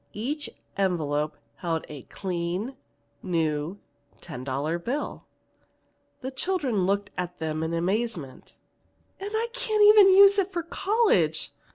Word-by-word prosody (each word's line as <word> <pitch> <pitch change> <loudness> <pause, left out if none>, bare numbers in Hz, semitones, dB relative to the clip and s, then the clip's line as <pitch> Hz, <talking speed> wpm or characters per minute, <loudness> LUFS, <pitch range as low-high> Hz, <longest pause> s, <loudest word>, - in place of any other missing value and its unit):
Each 285 +8 -3 0.3
envelope 155 -6 0 0.2
held 165 -2 -2
a 145 -3 -8
clean 180 - -4 0.5
new 160 -1 -1 0.4
ten 150 -7 -8
dollar 140 +6 -2
bill. 255 +12 -4 0.9
The 260 0 -4
children 260 - 0
looked 200 +1 0
at 180 0 -4
them 155 -1 -3
in 160 0 -2
amazement. 175 - -2 0.6
"And 395 +1 -4
I 445 +2 0
can't 440 -4 +1 0.2
use 395 +1 +7
it 390 0 0
for 345 -2 -2
college!" 340 - +1
190 Hz, 120 wpm, -26 LUFS, -, 0.9 s, use